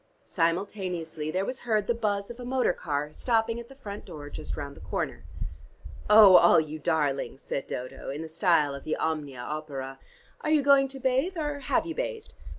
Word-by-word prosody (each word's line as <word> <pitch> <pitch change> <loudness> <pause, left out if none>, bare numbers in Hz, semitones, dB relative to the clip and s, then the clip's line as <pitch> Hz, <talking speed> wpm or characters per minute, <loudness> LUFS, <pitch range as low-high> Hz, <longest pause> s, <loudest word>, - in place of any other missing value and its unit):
Simultaneously 170 -3 -2
there 185 +4 0
was 255 +2 -4
heard 215 -4 0
the 235 - +2
buzz 205 -2 -1
of 240 - -11
a - - -6
motor 250 -5 +1
car 150 -2 -3
stopping 230 -1 +1
at 235 +1 -10
the 270 - -13
front 210 -6 -8
door 150 -5 -9
just - - -6
round 140 0 -6
the - - -13
corner. - - -4 0.8
"Oh, 210 -3 +10
all 170 - +7
you 155 0 -4
darlings," 145 -5 0
said 135 - -3
Dodo, 130 +2 -6
in 145 +4 -4
the - - -6
style 160 -3 +2
of 140 - -7
the 155 - -1
'Omnia 150 -5 -2
opera,' 135 -2 -5 0.4
"are 305 - -2
you 305 -2 +4
going 275 -1 +6
to 270 0 -8
bathe, 265 +8 +1
or 295 -2 -2
have 275 +2 +1
you 330 - -4
bathed? - - -4
185 Hz, 195 wpm, -28 LUFS, 150-250 Hz, 0.8 s, Oh